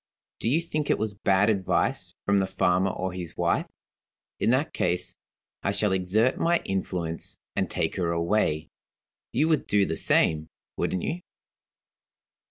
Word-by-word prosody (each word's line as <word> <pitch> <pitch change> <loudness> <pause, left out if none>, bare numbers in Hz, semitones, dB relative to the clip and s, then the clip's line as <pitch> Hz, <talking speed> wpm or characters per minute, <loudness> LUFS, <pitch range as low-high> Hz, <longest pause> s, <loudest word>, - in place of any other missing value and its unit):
Do - - 0
you 155 +7 +3
think 155 -3 -3
it - - +3
was 110 -1 -2
bad 100 +1 +3
advice 95 -3 0
from 100 0 +3
the 95 - +1
farmer 95 0 +2
or 95 0 -3
his 90 -2 -6
wife? - - +1 0.7
In - - +2
that 135 +6 +2
case, 90 0 0 0.5
I - - 0
shall 100 0 +2
exert 95 +7 +2
my 170 +1 +3
influence, 90 -4 -3 0.2
and - - 0
take - - -1
her 90 -3 0
away. 85 -2 +1 0.6
You 150 +6 +2
would 155 -3 +1
do 100 -1 +3
the - - -2
same, 80 -1 +2 0.3
wouldn't 90 - -1
you? 175 +2 -2
95 Hz, 155 wpm, -27 LUFS, 90-110 Hz, 0.7 s, you